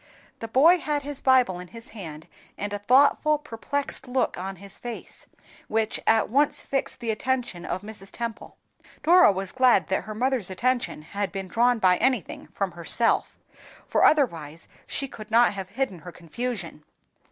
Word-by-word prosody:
The 225 - -5
boy 315 +10 +5
had 295 -2 -2
his 285 -1 -6
Bible 250 -9 +3
in 180 - -9
his 230 +4 -10
hand, 160 -8 -9 0.3
and 205 +1 -4
a 205 - -3
thoughtful, 280 +7 +4
perplexed 285 0 -4
look 250 0 0
on 190 +2 -5
his 195 +2 -11
face, 240 -1 -8 0.4
which 220 0 0
at 225 - +4
once 280 +5 +1
fixed 270 -2 -2
the 230 -1 -1
attention 235 -6 -2
of 185 - -3
Mrs. 205 -2 -8
Temple. 235 -2 -6 0.5
Dora 345 - +7
was 190 0 -4
glad 250 -9 +3
that 190 -1 -1
her 215 +1 -6
mother's 250 -4 0
attention 240 -4 -1
should 200 -2 -2
be 195 -1 -4
drawn 235 +6 +2
by 185 -4 +4
anything 255 -6 -1
from 195 -2 -3
herself, 175 +7 0 0.5
for - - +2
otherwise 165 - +2 0.2
she 275 - -3
could 215 -4 -11
not 235 +1 +4
have 190 -2 -6
hidden 215 -4 -3
her 175 +3 -10
confusion. 175 -2 -5
225 Hz, 165 wpm, -25 LUFS, 190-260 Hz, 0.5 s, Dora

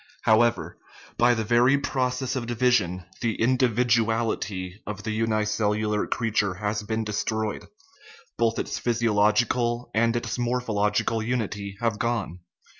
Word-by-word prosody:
However, 115 +2 +2 0.4
by 120 0 +5
the 110 - -1
very 120 +5 +4
process 130 -1 -1
of 120 -3 -3
division 115 -8 +1 0.2
the 115 -3 -1
individuality 115 -5 +1
of 105 0 -5
the 110 - -3
unicellular 105 -1 0
creature 105 -5 0
has 105 +1 -2
been 110 +1 -2
destroyed; 110 0 -2 0.7
both 115 -1 +1
its - - -3
physiological 120 +1 +1
and 115 +2 +2
its 120 0 -3
morphological 115 -3 0
unity 105 -4 -3
have 115 -3 0
gone. 110 -7 -2
115 Hz, 115 wpm, -25 LUFS, 105-120 Hz, 0.7 s, by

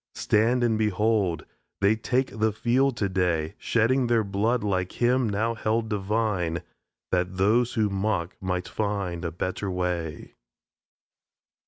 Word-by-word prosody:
Stand 120 +4 +2
and 110 -2 +2
behold! 105 -3 +1 0.3
They 100 +2 +4
take 125 +1 -1
the 110 0 +3
field 125 +4 +1
today, 90 -5 0
Shedding 120 +3 +2
their 115 -2 +3
blood 105 +4 0
like 95 -3 -1
Him 125 0 +3
now 110 +3 0
held 110 0 -1
divine, 100 -5 -1 0.5
That 90 0 0
those 115 +5 +2
who 110 -2 +2
mock 95 -3 -1
might 90 -1 -2
find 100 -5 -2
a 85 - -2
better 90 +3 -3
way! 90 -3 -3
105 Hz, 130 wpm, -26 LUFS, 90-115 Hz, 0.5 s, They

